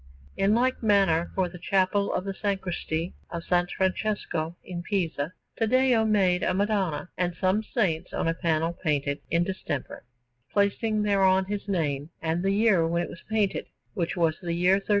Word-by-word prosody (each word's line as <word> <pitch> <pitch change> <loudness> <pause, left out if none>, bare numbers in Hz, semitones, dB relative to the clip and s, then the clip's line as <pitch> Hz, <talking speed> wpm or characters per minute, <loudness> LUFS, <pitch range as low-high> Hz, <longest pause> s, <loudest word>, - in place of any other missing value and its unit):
In 200 +2 +3
like 255 +2 +1
manner, 195 -6 +3
for 185 -1 +1
the 175 0 -10
Chapel 195 +2 +1
of 185 - -2
the 195 - -3
Sacristy 185 -4 -2 0.2
of 170 -1 -5
S. 175 0 +3
Francesco 185 -4 -1
in 175 -2 -5
Pisa 170 -5 -1 0.3
Taddeo 240 0 +3
made 190 -4 +3
a 185 - +1
Madonna 190 -5 0
and 175 -1 0
some 190 +3 +2
saints 195 -8 -1
on - - -1
a 165 - +2
panel 165 -1 0
painted 145 -4 -1
in 170 +1 +2
distemper, 175 -6 -4 0.5
placing 210 +1 +1
thereon 190 -2 +3
his 205 +1 -4
name 150 -6 -1
and 165 +1 -1
the 195 - +1
year 200 -5 +3
when 170 +1 0
it - - -6
was 170 - -10
painted, 215 -3 0 0.3
which 180 -3 -2
was 160 -2 +1
the 170 -2 -2
year 180 +2 +3
1394. 200 - -8
185 Hz, 170 wpm, -27 LUFS, 170-200 Hz, 0.5 s, In